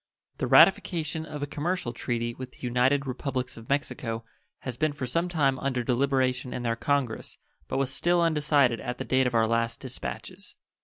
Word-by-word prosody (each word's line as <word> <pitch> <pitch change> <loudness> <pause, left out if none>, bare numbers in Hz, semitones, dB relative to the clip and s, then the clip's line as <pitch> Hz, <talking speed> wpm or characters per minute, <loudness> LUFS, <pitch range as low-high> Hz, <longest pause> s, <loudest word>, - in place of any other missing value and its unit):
The - - 0
ratification 160 -2 +4
of 150 -1 -5
a - - +1
commercial 155 -2 -2
treaty 120 -1 -2
with 130 +1 -8
the - - -9
United 130 +3 +2
Republics 130 -1 -3
of 115 0 -12
Mexico 115 -5 -2 0.4
has 130 -3 -4
been 155 +2 0
for 140 -3 -4
some 170 +8 0
time 140 -6 +1
under 130 -3 -1
deliberation 130 0 +1
in 125 - -4
their 115 -1 0
Congress, 125 0 -1 0.3
but - - -2
was 135 -1 0
still 175 +5 +2
undecided 150 -7 +3
at 125 - -4
the - - -4
date 130 0 +3
of 120 - -2
our 115 -1 +4
last 115 0 0
dispatches. 130 -2 -7
130 Hz, 185 wpm, -27 LUFS, 120-145 Hz, 0.4 s, ratification